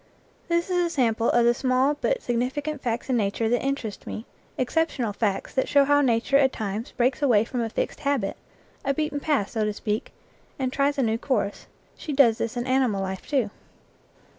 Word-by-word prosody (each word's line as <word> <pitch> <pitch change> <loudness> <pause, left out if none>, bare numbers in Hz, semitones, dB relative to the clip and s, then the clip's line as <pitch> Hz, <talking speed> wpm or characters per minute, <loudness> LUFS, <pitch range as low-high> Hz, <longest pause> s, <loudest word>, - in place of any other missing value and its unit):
This 340 +1 0
is 360 - +2
a 340 - 0
sample 235 -7 +1
of 240 0 +4
the 240 - +5
small 255 +3 +2
but - - 0
significant 265 +5 -2
facts 235 -1 -2
in 260 - +1
nature 215 +1 0
that 240 +1 +1
interest 270 -6 -3
me 220 - -5 0.3
exceptional 255 -4 0
facts 205 -2 -1
that 265 - 0
show 280 -1 +5
how 290 +1 +4
nature 250 +1 +3
at 270 -2 +4
times 215 +1 -4
breaks 250 +4 +1
away 230 -7 +4
from 245 0 -3
a 225 - -1
fixed - - -3
habit, 275 -9 0 0.5
a 275 0 0
beaten 305 -1 -1
path, 285 -9 0
so 220 -2 -1
to 210 0 0
speak, 210 +1 -3 0.5
and 260 -1 -2
tries 285 +1 +1
a 270 - +2
new 225 0 0
course. 210 -7 -1 0.3
She 300 - -5
does 245 -5 +5
this 230 +1 -2
in 240 - -2
animal 255 -7 +1
life 190 0 -5
too. 255 -8 0
250 Hz, 195 wpm, -25 LUFS, 225-280 Hz, 0.5 s, the